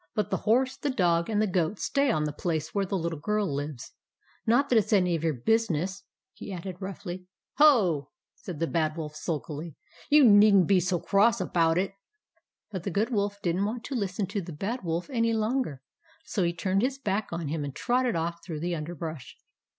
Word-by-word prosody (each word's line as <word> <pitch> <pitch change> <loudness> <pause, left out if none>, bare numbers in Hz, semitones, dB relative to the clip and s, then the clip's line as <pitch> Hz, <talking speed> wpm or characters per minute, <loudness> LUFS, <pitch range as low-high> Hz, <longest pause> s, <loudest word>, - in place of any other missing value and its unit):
" - - -58
But 210 -3 -1
the - - +1
horse, 255 +4 +3
the 290 - -2
dog, 175 -8 +1
and 210 -2 +1
the 215 - +3
goat 185 0 0
stay 280 +5 +1
on 155 -10 +1
the 150 -1 -2
place 160 -1 -2
where 200 -2 0
the 195 - -1
Little 165 -3 -3
Girl 210 +6 0
lives. 140 -2 -5 0.6
Not 250 +5 +3
that 245 - +4
it 205 - -2
's - - +1
any 180 -4 +3
of 160 - -4
your 160 -3 +1
business," 190 - 0 0.3
he - - -9
added, 180 0 -6
roughly. 185 -1 -6
" - - -65
Ho! 210 - +5
" - - -65
said 175 -6 -6
the 165 - +1
Bad 160 -1 -1
Wolf, 155 -2 -5
sulkily. 155 0 -5 0.2
" 170 - -23
You 295 0 +7
need 205 -1 +7
n't 185 -3 +6
be 195 -2 +5
so 180 0 0
cross 215 +6 +3
about 165 -3 +2
it." 190 +1 0 0.8
But 190 -3 -4
the 195 - -3
Good 210 +6 0
Wolf 205 -2 -1
did 170 -1 +1
n't 195 - +1
want 230 +3 -3
to 285 - -6
listen 200 -3 -1
to 200 +2 -3
the 175 -1 -8
Bad 205 - -4
Wolf 170 0 -2
any 230 -2 +1
longer, 220 - -1 0.4
so 205 - -2
he 170 -1 +2
turned 185 +3 0
his 265 +3 0
back 210 -5 -1
on 170 -3 -3
him 155 0 -2
and 140 -2 -6
trotted 250 -2 +1
off 170 +1 -3
through 155 -4 -6
the 175 +1 -1
underbrush. 155 -3 -6
185 Hz, 225 wpm, -28 LUFS, 165-215 Hz, 0.8 s, You